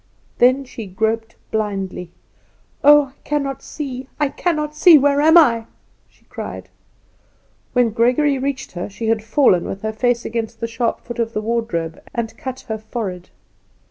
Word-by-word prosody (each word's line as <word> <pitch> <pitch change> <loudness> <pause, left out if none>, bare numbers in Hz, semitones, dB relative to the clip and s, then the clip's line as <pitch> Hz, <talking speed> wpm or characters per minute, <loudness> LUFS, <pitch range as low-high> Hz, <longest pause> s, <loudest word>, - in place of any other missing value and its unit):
Then 255 +3 +4
she 230 -4 -8
groped 220 +3 -2 0.2
blindly. 195 -4 -3 0.7
"Oh, 290 -2 +6
I - - -37
cannot 275 -2 -2
see! 265 -3 -6
I 295 -2 +2
cannot 300 0 -2
see! 330 +1 +8
Where 285 0 +3
am 320 +3 +6
I?" 230 -8 +4 0.4
she - - -31
cried. - - -7 1.0
When 245 -3 +3
Gregory 255 +5 +2
reached 275 0 -3
her 175 +2 -5
she 220 +3 -4
had 225 -1 +1
fallen 225 -6 +3
with 195 +2 -6
her 220 0 -2
face 240 +1 0
against 230 0 -4
the 230 - -2
sharp 230 +1 -2
foot 240 -1 -8
of 230 0 -1
the 215 - -1
wardrobe 215 -8 -2
and 230 -2 -3
cut 260 -1 -6
her 220 -2 -5
forehead. 205 -5 -5
235 Hz, 160 wpm, -20 LUFS, 220-275 Hz, 1.0 s, see